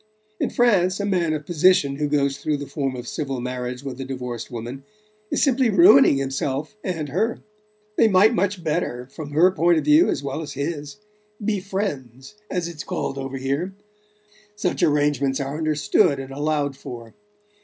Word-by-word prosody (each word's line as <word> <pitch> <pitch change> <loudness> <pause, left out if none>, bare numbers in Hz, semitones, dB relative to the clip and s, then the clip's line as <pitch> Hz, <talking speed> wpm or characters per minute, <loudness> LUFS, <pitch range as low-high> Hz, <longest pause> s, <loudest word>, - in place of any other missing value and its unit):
In - - 0
France, 195 -6 +2
a 200 - -1
man 180 -5 +1
of 150 -1 -3
position 170 -4 +3
who 150 0 0
goes 140 -1 0
through 150 0 -1
the 145 - -6
form 135 -1 -3
of 125 - -7
civil 135 -5 -3
marriage 125 +1 -4
with 135 -1 -6
a - - -2
divorced 125 -3 -5
woman 120 +3 -7 0.5
is - - +1
simply 260 -3 +3
ruining 145 -8 +7
himself 135 +5 -2
and 165 -6 -3
her. 220 - -1 0.5
They 225 - +6
might 205 +3 +5
much 200 -4 -1
better 150 -6 -2
from 150 0 -7
her 165 +6 +4
point 175 -2 +3
of - - -1
view 305 +4 +5
as - - -2
well 140 +3 -3
as 150 -3 -6
his 145 +1 -4 0.5
be 210 -2 +1
'friends,' 150 - -5 0.2
as 180 -2 -2
it's 165 -4 -7
called 135 - -3
over 135 0 -5
here: 140 +9 -2 0.8
such 210 - -2
arrangements 145 -4 +2
are 140 +1 -3
understood 155 +1 +2
and 135 0 -7
allowed 145 0 -1
for. 120 -3 -9
145 Hz, 175 wpm, -23 LUFS, 135-180 Hz, 0.8 s, ruining